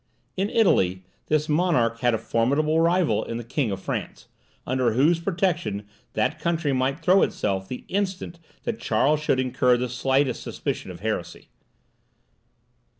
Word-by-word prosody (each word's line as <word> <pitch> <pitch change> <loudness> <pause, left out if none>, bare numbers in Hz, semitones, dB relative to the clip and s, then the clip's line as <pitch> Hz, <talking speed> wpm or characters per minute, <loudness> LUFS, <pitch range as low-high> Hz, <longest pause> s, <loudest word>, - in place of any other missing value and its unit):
In 195 +2 0
Italy 95 - +2 0.2
this 150 0 +1
monarch 150 -8 +2
had 120 -2 +2
a - - 0
formidable 140 +9 +1
rival 170 0 +2
in 115 - -5
the 120 - -5
King 125 +1 -1
of 95 -1 -3
France, - - -5 0.4
under 130 -3 +1
whose 155 +8 +3
protection 170 - -1 0.3
that - - 0
country 165 -4 0
might 135 +4 0
throw 185 +3 +5
itself 95 -1 -1
the 125 - -7
instant 190 -3 -3 0.2
that 235 -2 -3
Charles 140 +7 +2
should 150 -3 +1
incur 125 -1 +2
the 125 +1 -1
slightest 130 +1 0
suspicion - - -4
of - - -9
heresy. - - -4
140 Hz, 150 wpm, -25 LUFS, 120-170 Hz, 0.4 s, throw